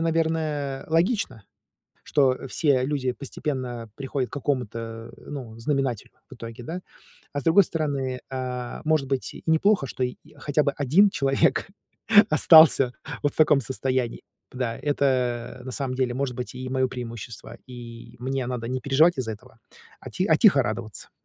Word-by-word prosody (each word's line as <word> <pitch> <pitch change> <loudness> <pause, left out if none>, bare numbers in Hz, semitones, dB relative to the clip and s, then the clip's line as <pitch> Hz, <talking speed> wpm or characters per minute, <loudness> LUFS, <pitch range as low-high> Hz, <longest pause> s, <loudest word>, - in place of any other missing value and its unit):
наверное, 160 -4 -1
логично, 170 - 0 0.6
что 135 -2 +1
все 140 -4 +2
люди 130 -3 -1
постепенно 125 -4 -5
приходят 135 -3 -3
к - - -39
какому-то, 115 -5 -3
ну, 125 -6 -8
знаменателю 135 -4 -1 0.2
в - - -10
итоге, 115 0 -9
да? 175 +7 -5 0.5
А 145 - -2
с - - -13
другой 180 +5 +6
стороны, 140 -6 -2
а, 125 -2 -4
может 155 -3 +2
быть, 135 -1 -2
и - - -11
неплохо, 160 0 +3
что 130 - -5
й 125 - -4 0.2
хотя 150 0 +1
бы 140 - +1
1 155 +9 +4
человек 135 +5 +1 0.6
остался 155 -5 +7 0.3
вот 145 - +1
в - - -9
таком 150 -3 +5
состоянии. 130 -1 -2 0.3
Да, 125 -3 -3
это, 125 -4 0
на 130 - -7
самом 130 0 -3
деле, 130 -2 0
может 130 -2 -2
быть, 125 0 -6
и 130 0 -6
мое 130 0 +1
преимущество, 120 -3 -8
и 120 -1 -10
мне 130 0 -2
надо 120 -2 -4
не 130 +1 -2
переживать 150 +4 +4
из-за 110 -3 -2
этого, 115 +1 -16 0.4
а - - -9
ти 185 - -1
а - - +4
тихо 185 - +5
радоваться, 110 -2 -5
130 Hz, 160 wpm, -25 LUFS, 125-145 Hz, 0.6 s, остался